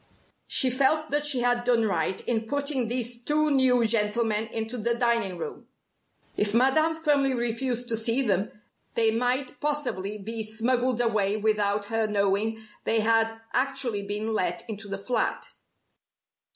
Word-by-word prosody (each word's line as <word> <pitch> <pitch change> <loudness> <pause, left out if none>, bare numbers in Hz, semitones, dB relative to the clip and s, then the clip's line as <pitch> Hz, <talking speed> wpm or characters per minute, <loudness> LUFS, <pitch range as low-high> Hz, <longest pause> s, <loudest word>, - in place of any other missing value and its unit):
She 255 - +3
felt 285 +4 +1
that 295 0 +2
she 265 -4 +1
had 245 0 +1
done 240 -2 +2
right 185 -2 -1
in 225 -2 -1
putting 280 -2 -1
these 240 0 -3
two 305 +2 +1
new 255 -3 +3
gentlemen 220 0 +1
into 225 +1 -4
the 235 +2 0
dining 235 -6 0
room. 170 - -7 0.7
If 210 +1 0
Madame 310 +6 +3
firmly 290 -4 +1
refused 240 +1 -2
to 230 - +1
see 230 +4 +2
them, 200 -3 0 0.4
they 225 -1 +4
might 250 +3 -1
possibly 250 -10 -2
be 220 +3 -3
smuggled 240 +3 0
away 215 -3 +1
without 210 -1 0
her 225 -1 +1
knowing 210 +2 0 0.2
they 225 -1 +2
had 225 0 +1
actually 260 -5 +1
been 210 +2 -2
let 180 +1 -2
into 215 -2 -7
the 195 - -3
flat. 225 +3 -2
230 Hz, 150 wpm, -26 LUFS, 215-255 Hz, 0.7 s, they